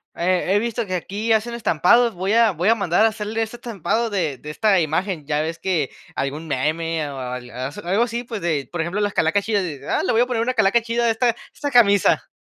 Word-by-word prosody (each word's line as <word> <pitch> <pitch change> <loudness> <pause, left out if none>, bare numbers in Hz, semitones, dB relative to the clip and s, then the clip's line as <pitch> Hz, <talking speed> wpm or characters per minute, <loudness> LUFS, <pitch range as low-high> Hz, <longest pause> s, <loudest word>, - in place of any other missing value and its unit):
he 185 +2 +1
he 205 - +4
visto 235 0 -2
que 185 -1 -3
aquí 210 +6 -1
hacen 220 +2 0
estampados, 230 +3 +3
voy 190 +2 -2
a 230 0 +5
voy 180 +3 0
a 225 - +5
mandar 195 -2 +2
a 225 - +5
hacerle 215 +1 -4
ese 225 +2 -4
estampado 230 - -2
de 165 -10 -1
de 150 - -10
esta 200 +3 +2
imagen", 160 0 -1
ya 150 -1 0
ves 160 +1 -4
que 165 -8 0 0.3
algún 150 +4 -3
meme, 155 +2 -1
o 140 - -7
o - - -5
al 125 -1 -6
aso 130 +6 -6
algo 195 +6 +2
así, 240 0 -3
pues, 230 -3 -6
de, 155 -7 -2
por 175 - -5
ejemplo, 170 +5 -1
las 205 -1 0
calacas 180 +6 +1
chidas, 205 -2 0
eh: 150 -6 -6
"Ah, - - +1
le - - +1
voy 230 - +4
a - - +4
poner 240 -3 -1
una 250 +2 0
calaca 220 0 +3
chida 235 +1 -1
a - - +3
esta 235 +2 +2
a - - -12 0.2
esta 285 -1 -4
camisa". 205 -5 +4
195 Hz, 250 wpm, -21 LUFS, 160-225 Hz, 0.3 s, a